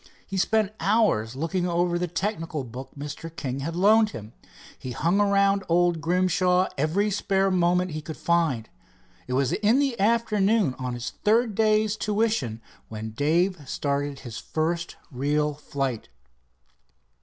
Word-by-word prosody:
He 195 - -7
spent 210 +2 +2
hours 195 - +2
looking 175 +5 -1
over 175 0 +1
a 180 +1 -1
technical 165 -4 -3
book 125 +2 -8
Mr. 145 +3 -6
King 135 -3 -4
had 165 +4 -4
loaned 215 +4 +5
him. 110 - -9 0.5
He 125 - -6
hung 175 - +1
around 200 -1 +3
old 175 -1 +2
Grimshaw 180 +1 +2
every 170 +9 +1
spare 195 -1 +1
moment 180 0 +2
he 155 0 -4
could 155 +1 -8
find. 160 -10 +1 0.6
It 125 - -3
was 130 0 +1
the 240 +4 +2
afternoon 215 - +2
on 125 -1 -3
his 120 0 -5
third 225 +1 +3
day's 215 0 +2
tuition 210 - -1 0.3
when 110 0 -6
Dave 165 - +1
started 140 -1 -2
his 120 -2 -7
first 165 +6 -2 0.2
real 150 +3 0
flight. 135 -5 -4
175 Hz, 140 wpm, -25 LUFS, 140-200 Hz, 0.6 s, loaned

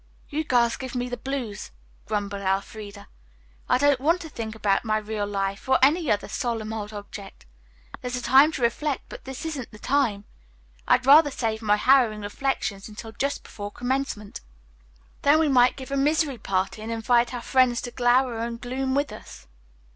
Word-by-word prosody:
"You 310 +1 -2
girls 240 -5 +2
give 260 -1 -7
me 245 0 -2
the 245 - -3
blues," 245 -5 -5 0.4
grumbled 200 -1 -2
Elfreda. 200 +1 -3 0.6
"I - - +4
don't 285 0 +3
want 330 +6 +2
to 320 - -8
think 225 -5 -6
about 205 -3 +1
my 215 -2 +1
'real 215 -1 -3
life' 195 +3 -3
or 260 - +5
any 310 +2 +4
other 205 -1 +1
solemn 225 -4 -3
old 210 -2 -4
subject. 205 - -10 0.6
There's 250 0 -3
a 250 - -3
time 270 +6 +6
to 260 - -3
reflect, 270 +4 0
but - - -10
this 265 +3 -7
isn't 290 -7 -4
the 210 - -13
time. 230 -5 0 0.6
I'd 250 - +3
rather 290 +2 +8
save 225 -4 -2
all 220 - -7
my 205 - +5
harrowing 235 -2 +3
reflections 205 -2 -3
until 220 +1 -9
just 280 +5 -2
before 205 -1 -7
commencement. 245 -3 -3 0.8
Then 290 +2 +5
we 315 -1 +2
might 250 -2 +4
give 265 0 -9
a 275 - 0
misery 290 -2 +1
party 195 +1 -2
and 220 +1 -5
invite 235 +1 +2
our 245 -2 -5
friends 255 -2 +3
to 245 - -6
glower 245 -1 +2
and 230 0 -4
gloom 260 +2 -2
with 285 +1 0
us." - - -11
240 Hz, 185 wpm, -25 LUFS, 210-270 Hz, 0.8 s, rather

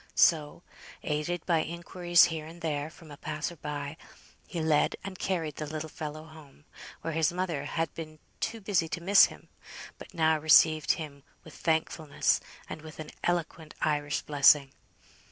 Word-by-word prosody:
So, 155 0 +3 0.4
aided 150 +3 -2
by 170 -3 +3
inquiries 175 +1 +2
here 160 -3 0
and 170 +1 -12
there 150 -2 -2
from 160 -1 -15
a 145 - -10
passer 155 +4 -4
by, 145 0 -5 0.5
he 175 - -4
led 155 -2 +2
and 190 -1 -7
carried 165 -6 -2
the 155 - -4
little 155 +1 -5
fellow 155 0 -6
home, 155 -2 -16 0.4
where 165 - -3
his 160 -1 +2
mother 175 -5 -2
had 165 +2 -2
been 155 -1 -8 0.2
too 225 0 -3
busy 190 -5 +1
to 160 - -4
miss 195 +2 +8
him, - - -11 0.5
but - - -12
now 160 -1 +3
received 155 -1 +5
him 145 -4 -7 0.2
with - - -13
thankfulness, 160 -2 0 0.3
and 155 - -7
with 155 -1 -11
an 155 -1 -7
eloquent 170 -2 -2
Irish 145 -1 0
blessing. 140 -1 +5
160 Hz, 160 wpm, -29 LUFS, 150-170 Hz, 0.5 s, miss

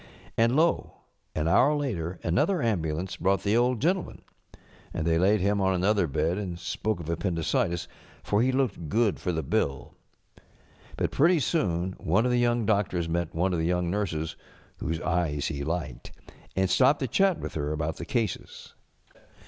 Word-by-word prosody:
And 115 +2 +3
lo! 165 +3 +2 0.4
an 80 0 0
hour 145 - +4
later 95 - -3
another 170 - +1
ambulance 90 - -1
brought 95 +2 +1
the 105 +2 +2
Old 120 0 +2
Gentleman. 180 - -1 0.7
And 80 - -2
they 80 0 +2
laid 100 +3 +3
him 100 +1 +1
on 95 0 +2
another 95 0 +2
bed 80 +6 0
and 90 -4 -4
spoke 110 +3 -2
of 85 - -7
appendicitis, 85 0 -1 0.4
for 105 +1 +1
he 130 +2 +3
looked 125 - -1
good 110 0 +1
for 90 - -1
the 80 -2 -2
bill. 70 0 -1 1.0
But - - 0
pretty 165 +4 +4
soon 95 - 0
one 95 +9 +2
of 125 - +2
the 125 - +2
young 120 -1 +2
doctors 100 -5 +1
met 85 0 -2
one 90 +3 +1
of 85 - 0
the 80 - 0
young 90 -1 0
nurses 85 -6 -2 0.4
whose 80 +2 -2
eyes 80 -5 0
he 70 -3 -4
liked, 80 -5 -4 0.4
and 95 0 +2
stopped 135 +9 +4
to 130 - 0
chat 195 +2 +2
with - - -6
her 75 -1 -2
about 75 +1 -2
the - - -6
cases. 115 -4 -3
95 Hz, 175 wpm, -27 LUFS, 80-115 Hz, 1.0 s, hour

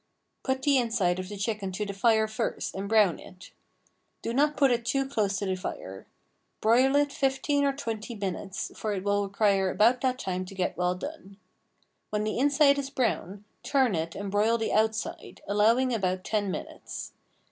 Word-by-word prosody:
Put 265 0 -2
the 280 -2 +4
inside 215 -7 +1
of 185 0 -5
the 205 - -6
chicken 200 -1 -2
to 210 +3 -2
the 200 - -5
fire 220 +2 +3
first 215 +1 -3
and 195 +1 -5
brown 210 -6 +4
it. 185 +1 -13 0.7
Do 230 - -2
not 295 +3 +2
put 275 -3 +4
it 235 -1 +1
too 270 +4 0
close 205 -7 0
to 200 - -2
the 190 -1 0
fire. - - -7 0.5
Broil 250 +5 +4
it 290 0 +3
fifteen 275 +1 +1
or 275 - +2
twenty 230 -3 -5
minutes, 195 -1 -4
for 215 -1 -2
it 190 -2 -3
will 205 0 +1
require 200 -1 +2
about 235 +6 +3
that 255 -1 +1
time 185 -5 -3
to 195 - -10
get 185 -1 -1
well 180 0 0
done. 200 -3 -8 0.7
When 210 0 -1
the 215 +2 -2
inside 285 +1 +4
is 275 -1 -4
brown, 210 -6 -2 0.2
turn 265 -6 +2
it 165 0 -2
and 200 -1 -5
broil 215 +3 +3
the 225 - -2
outside, 220 0 -1
allowing 230 +5 +3
about 185 -4 -1
ten 205 -2 -1
minutes. - - -6
215 Hz, 185 wpm, -28 LUFS, 195-260 Hz, 0.7 s, the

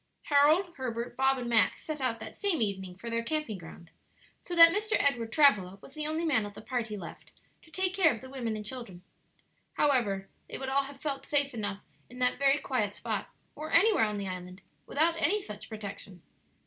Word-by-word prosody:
Harold, 310 +5 +4
Herbert, 240 -2 -4
Bob, 265 0 +3
and 245 -2 -4
Max 225 -5 +3
set 305 -2 -5
out 240 -3 -1
that - - -8
same 400 -7 0
evening 190 -4 -2
for 210 +6 -10
their 230 0 0
camping 230 -5 -2
ground; 165 0 -12 0.5
so 350 - -5
that 335 0 +9
Mr. 425 +1 0
Edward 240 -5 +1
Travilla 205 -10 +4
was 270 - -14
the 305 0 -3
only 315 +2 -1
man 275 -9 +2
of 205 0 -8
the - - -9
party 230 -4 -3
left 175 -4 -10 0.3
to - - -20
take 370 +2 -1
care 365 -5 +5
of 230 - -5
the 260 - -11
women 245 -4 -3
and 210 -1 -6
children. 215 -7 -8 0.7
However, 215 -9 +1 0.2
they - - -5
would 265 0 -4
all 275 +1 +2
have 275 0 -10
felt 275 -2 -4
safe 285 -2 +2
enough 205 -3 -4 0.3
in 250 - -12
that 250 0 +1
very 275 0 +4
quiet 230 -8 -1
spot, - - -4 0.3
or 310 +1 -6
anywhere 420 - +5
on 210 -1 -2
the 200 -1 -4
island, 185 +1 -7 0.2
without 330 +3 +1
any 420 - +3
such 210 - -9
protection. 200 -4 -8
255 Hz, 205 wpm, -30 LUFS, 210-300 Hz, 0.7 s, that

